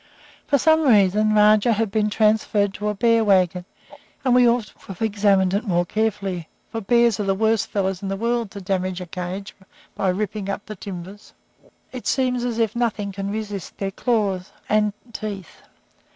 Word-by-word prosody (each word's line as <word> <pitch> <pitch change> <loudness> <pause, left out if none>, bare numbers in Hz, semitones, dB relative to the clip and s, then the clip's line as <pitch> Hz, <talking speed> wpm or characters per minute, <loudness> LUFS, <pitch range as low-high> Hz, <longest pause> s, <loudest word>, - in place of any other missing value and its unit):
For 285 - +3
some 315 +4 +4
reason 215 -4 +4
Rajah 210 +2 +5
had 220 -1 -1
been 210 0 +1
transferred 210 -2 +2
to 210 +2 -4
a 210 - -2
bear 230 +1 +3
wagon, 185 -3 +2 0.6
and 255 - +3
we 250 -1 +6
ought 235 -2 +1
to - - -20
have 190 -3 -8
examined 200 -3 +2
it 200 +4 0
more 175 -5 +1
carefully, 195 -4 -2 0.2
for 225 - -4
bears 235 +1 +3
are - - 0
the 195 -1 +1
worst 220 +1 +1
fellows 190 -2 -2
in 195 - -4
the 195 - -2
world 235 0 -1
to 200 0 -9
damage 185 -1 -2
a 180 - -6
cage 180 +3 -6 0.4
by 190 - 0
ripping 200 +1 -2
up 200 +1 -4
the 215 - -7
timbers; 190 +1 -9 0.6
it 255 -2 -7
seems 250 -2 +1
as 240 -2 -2
if 225 -1 0
nothing 220 -4 -1
can 195 +1 -4
resist 205 -3 -5
their 195 -1 -3
claws 200 -5 -1 0.2
and 210 -1 +2 0.2
teeth. 200 -6 -7
210 Hz, 180 wpm, -22 LUFS, 195-225 Hz, 0.6 s, we